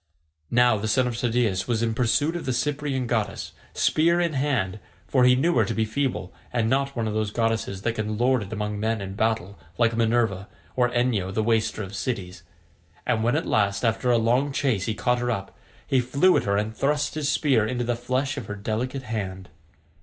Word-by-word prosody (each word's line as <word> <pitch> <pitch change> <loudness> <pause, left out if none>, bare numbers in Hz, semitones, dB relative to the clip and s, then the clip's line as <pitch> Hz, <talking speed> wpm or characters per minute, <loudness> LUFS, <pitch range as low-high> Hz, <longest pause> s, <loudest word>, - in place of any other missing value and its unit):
Now 120 -2 +4
the 105 +2 -3
son 130 +4 +2
of 125 -1 -2
Tydeus 115 -5 0
was 115 -2 0
in 115 -1 0
pursuit 135 +8 +1
of 170 - -5
the 130 - +1
Cyprian 140 0 -1
goddess, 110 -4 -2 0.2
spear 170 +2 +3
in 170 -2 +1
hand, 130 -9 0 0.3
for 130 -2 +3
he 125 0 +6
knew 165 +7 +2
her 110 - +4
to - - -3
be 110 - +1
feeble 110 -4 -2 0.2
and 115 -2 +1
not 135 +3 0
one 115 -2 -1
of 110 - -2
those 110 -1 0
goddesses 110 -3 -1
that 115 - 0
can 110 -1 -3
lord 125 +1 +2
it 100 -1 -7
among 105 -1 -3
men 110 +1 0
in 95 -1 -5
battle 100 -2 -1 0.2
like 115 -1 +2
Minerva 115 -4 +1 0.3
or 125 -1 +3
Enyo 120 -6 0
the 110 +3 0
waster 110 -1 +1
of 95 +1 -8
cities, 95 -6 -4 0.6
and 110 -2 +1
when 120 +4 +2
at 160 - 0
last 100 +2 +1
after 115 +2 +1
a 120 - +5
long 125 +5 +2
chase 130 -9 0
he 110 - -1
caught 125 +2 +1
her 120 0 -1
up, 100 -5 -3 0.3
he 135 - +2
flew 140 +9 +3
at - - +1
her 100 0 +1
and 105 +2 -2
thrust 145 +3 0
his 150 -2 -1
spear 135 -7 +2
into 120 +1 -2
the 120 0 0
flesh 130 +4 -2
of 120 -7 -5
her 105 - -4
delicate 115 +6 -3
hand. 95 -5 -5
115 Hz, 215 wpm, -25 LUFS, 105-130 Hz, 0.6 s, he